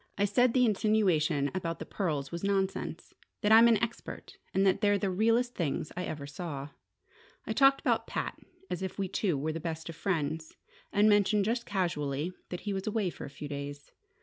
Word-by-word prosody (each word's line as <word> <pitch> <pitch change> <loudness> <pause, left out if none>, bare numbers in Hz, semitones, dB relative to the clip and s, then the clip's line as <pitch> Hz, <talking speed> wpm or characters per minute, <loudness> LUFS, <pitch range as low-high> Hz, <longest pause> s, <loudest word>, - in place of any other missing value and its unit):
I 205 - +3
said 240 +4 +3
the 250 -1 +5
insinuation 185 -9 +2
about 170 -3 -2
the - - -7
pearls 150 -8 -2
was 170 +1 -5
nonsense: 195 -1 -1 0.3
that 210 -1 +2
I'm 225 +2 +9
an 230 -2 +5
expert, 230 +1 -5
and 195 +1 +2
that 195 +1 +3
they're 205 -1 +4
the 195 -1 -1
realest 230 +5 +2
things 150 -3 -2
I 180 - -3
ever 145 -2 -5
saw. 145 -2 -6 0.8
I 220 - -2
talked 270 +3 +5
about - - +1
Pat - - -3 0.3
as 180 - -4
if 190 -1 -4
we 195 -1 -1
two 180 -4 0
were 155 +3 -2
the 165 - -4
best 160 0 -5
of 165 - -6
friends, 160 -3 -2 0.3
and 205 +1 +4
mentioned 205 -1 +4
just 235 +2 -1
casually 170 -4 -1 0.2
that 180 - -5
he 205 - -3
was 190 +1 -4
away 210 -4 0
for - - -8
a - - -7
few 145 +1 -8
days. 145 0 -6
190 Hz, 200 wpm, -30 LUFS, 155-210 Hz, 0.8 s, I'm